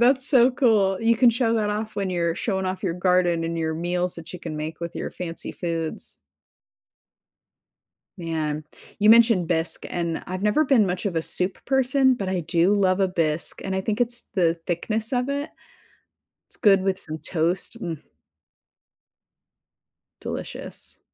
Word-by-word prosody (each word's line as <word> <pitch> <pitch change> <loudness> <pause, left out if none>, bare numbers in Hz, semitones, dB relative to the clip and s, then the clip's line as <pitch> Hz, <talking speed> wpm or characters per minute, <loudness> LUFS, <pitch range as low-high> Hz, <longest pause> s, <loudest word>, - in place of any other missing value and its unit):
That's 260 +2 +4
so 255 -3 +5
cool. 215 -7 +2
You 230 +1 +3
can 245 +1 +5
show 235 0 +2
that 215 -2 0
off 215 +1 -4
when 195 -1 -1
you're 170 -2 0
showing 190 -1 -2
off 185 0 -3
your 180 -4 -1
garden 180 -2 +2
and 165 0 -3
your 160 -1 -1
meals 175 +2 -1
that 165 0 -10
you 180 - -8
can 160 -3 -6
make 155 +1 -5
with 170 -1 -5
your - - -4
fancy 170 -2 -6
foods. 165 -2 -4 2.0
Man, 155 -3 -3 0.3
you 210 0 +3
mentioned 225 -6 +5
bisque 165 -1 0
and 170 -2 -3
I've 185 +1 -5
never 210 +9 +3
been 260 -6 +4
much 180 +1 -2
of 190 - -2
a 165 - 0
soup 180 +3 +3
person, 265 0 +3
but 200 -6 -4
I 185 -1 -1
do 170 +4 +2
love 190 -2 +2
a 195 - +3
bisque. 165 -3 -1
And 190 0 -2
I - - 0
think 210 +4 -2
it's 240 0 0
the 170 -3 +2
thickness 215 +7 -2
of 250 +1 0
it. 285 +2 -3 1.0
It's - - -7
good 195 -2 +4
with 190 0 0
some 155 0 -4
toast. 165 +3 -2
Mm. 165 -4 -4 2.2
Delicious. - - -7
185 Hz, 170 wpm, -24 LUFS, 170-225 Hz, 2.2 s, so